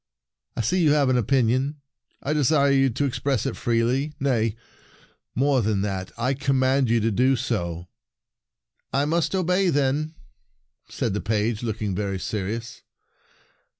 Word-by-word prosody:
" - - -56
I - - +1
see 180 - +1
you 150 -3 +4
have 145 -3 +3
an 130 - +3
opinion. 130 +4 +1 0.4
I 145 - 0
desire 145 -1 +3
you 135 -1 +4
to 135 +4 -1
ex 135 - -2
press 135 -6 0
it - - -2
freely. 125 +6 0
Nay, 115 -6 +1 0.8
more 135 0 +2
than 105 -2 0
that, 95 -2 -3
I 125 +4 0
command 135 -1 +1
you 115 0 +3
to 115 +1 +1
do 130 +6 +3
so." 90 - -3 1.0
"I 140 +2 +1
must 165 +4 0
obey, 185 +1 +2
then," 145 +2 0 0.7
said - - -2
the 105 - -2
page, 110 +1 -1
looking 110 -4 -2
very 100 0 -2
serious. 110 +4 -4
130 Hz, 150 wpm, -24 LUFS, 110-140 Hz, 1.0 s, you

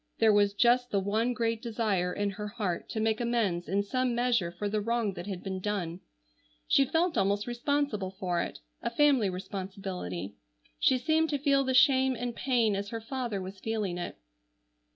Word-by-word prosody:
There 220 -1 +5
was 205 -1 +3
just 245 +3 +4
the 200 - +1
one 215 +5 0
great 230 -2 -1
desire 215 -6 0
in 205 +2 -1
her 210 +2 -5
heart 205 -5 -3
to 220 - -3
make 220 +1 +1
amends 220 -8 0
in 200 +2 +1
some 255 +3 0
measure 235 -8 +1
for 190 +4 -4
the 210 +1 -1
wrong 230 -2 0
that 175 +1 -7
had 190 -3 -5
been 190 -1 -3
done. 185 -4 -3 0.7
She 275 - +5
felt 325 +5 +1
almost 200 +1 +1
responsible 240 -5 -1
for 185 -2 -2
it, - - -5 0.2
a - - -1
family 260 -4 +3
responsibility. 185 - -5 0.4
She 260 - +4
seemed 315 +4 +2
to 290 - 0
feel 275 -1 +3
the 260 -1 0
shame 260 0 +5
and 245 0 -4
pain 235 -5 +2
as 200 +1 -3
her 230 - -4
father 235 -2 -3
was 190 +1 -8
feeling 210 -5 -2
it. 175 - -5
215 Hz, 185 wpm, -29 LUFS, 195-245 Hz, 0.7 s, There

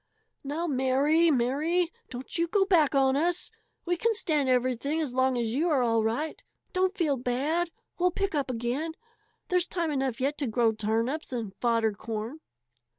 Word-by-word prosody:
"Now, 295 +5 -2
Mary, 285 +3 +3
Mary! 305 +7 +1 0.2
Don't 250 +1 -7
you 335 0 +1
go 390 +3 +2
back 315 -8 +3
on 265 -1 +4
us. 345 +4 0 0.3
We 350 0 0
can 455 +5 +1
stand 305 - +1
everything 255 +4 +1
as 295 -6 -2
long 260 0 +2
as 230 -2 -1
you 320 +7 +1
are 275 -5 +3
all 230 -2 +2
right. 260 +9 -2 0.3
Don't 375 +2 +1
feel 305 -7 +1
bad! 280 +8 0 0.3
We'll 360 +1 +4
pick 395 +2 -2
up 285 -3 -1
again. 250 +7 -2 0.6
There's 360 -1 +2
time 335 -3 -1
enough 265 -4 -1
yet 275 +3 -1
to 280 - -1
grow 230 0 +2
turnips 225 +8 -1
and 225 -6 -4
fodder 230 -2 +2
corn." 225 +7 -5
275 Hz, 170 wpm, -28 LUFS, 245-335 Hz, 0.6 s, on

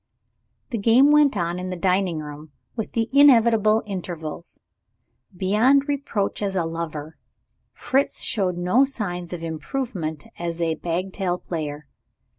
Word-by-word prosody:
The 230 - -2
game 240 +7 +5
went 295 -6 +4
on 175 0 -1
in 185 0 -4
the 185 - -3
dining 180 -2 0
room 150 0 -9 0.2
with 220 -3 -5
the 225 -1 0
inevitable 230 -6 +5
intervals. 175 -5 -6 0.8
Beyond 230 +10 +3
reproach 275 -10 -2
as 195 -2 -2
a 175 -3 +1
lover, 160 -2 -5 0.5
Fritz 270 +2 0
showed 185 -5 0
no 180 +9 +3
signs 180 -10 -3
of 175 -2 -6
improvement 160 - -4 0.2
as 170 -1 -4
a 165 -1 +1
bagatelle 180 +2 -2
player. 150 -4 -5
185 Hz, 130 wpm, -23 LUFS, 165-225 Hz, 0.8 s, game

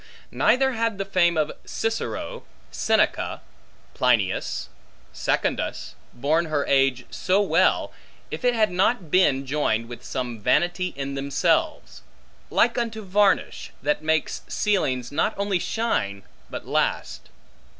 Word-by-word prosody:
Neither 265 +1 +3
had 230 -3 -1
the 195 - -3
fame 175 -3 +2
of 155 -1 +1
Cicero, 225 - -3 0.3
Seneca, - - +1 0.5
Plinius 115 -7 +1 0.5
Secundus, - - -1 0.2
borne 155 +7 +1
her 150 -3 -1
age 135 -2 +2
so 190 +2 +1
well, 205 - +2 0.4
if - - -5
it 245 -1 +3
had 215 -3 +2
not 185 -1 +1
been 145 -7 +3
joined 130 -5 0
with 120 0 -9
some 120 -3 -4
vanity 175 - +1
in 140 0 -3
themselves; 140 0 0 0.5
like 240 +1 +2
unto 225 -2 -3
varnish, 200 +1 +1
that 150 +2 +1
makes 160 0 0
ceilings 130 - 0
not 160 +9 0
only 200 -2 0
shine 100 - -1 0.3
but - - -7
last. - - -1
160 Hz, 120 wpm, -24 LUFS, 135-205 Hz, 0.5 s, Neither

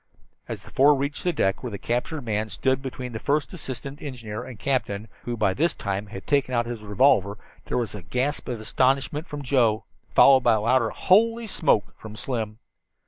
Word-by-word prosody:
As - - -6
the - - -14
four 145 +2 +5
reached 140 +2 -3
the 180 - +2
deck 95 - 0
where 125 - -4
the 100 - -5
captured 125 +7 -2
man 110 -1 -1
stood 130 +6 0
between 130 -2 -6
the 110 - -5
first 145 +6 0
assistant 140 -3 -7
engineer 115 -6 -6
and 125 -3 -9
the - - -16
captain, 110 -6 -1 0.2
who 120 - -2
had 120 - -6
by 100 -3 +2
this 165 - +1
time 100 0 -3 0.2
taken 140 -3 +1
out 120 0 +2
his 120 -2 -5
revolver, 105 -1 +3 0.3
there - - -2
was 120 -3 -1
a 105 - -7
gasp 125 - -2
of 120 -3 -3
astonishment 135 +7 +1
from 145 -2 -6
Joe, 120 -5 +2 0.3
followed 135 -1 +7
by 120 -2 +4
a 110 - +1
louder 115 +1 +3
"Holy 230 - +3
smoke!" 155 - +1
from 110 -1 -9
Slim. 110 -3 -4
125 Hz, 200 wpm, -25 LUFS, 110-140 Hz, 0.3 s, followed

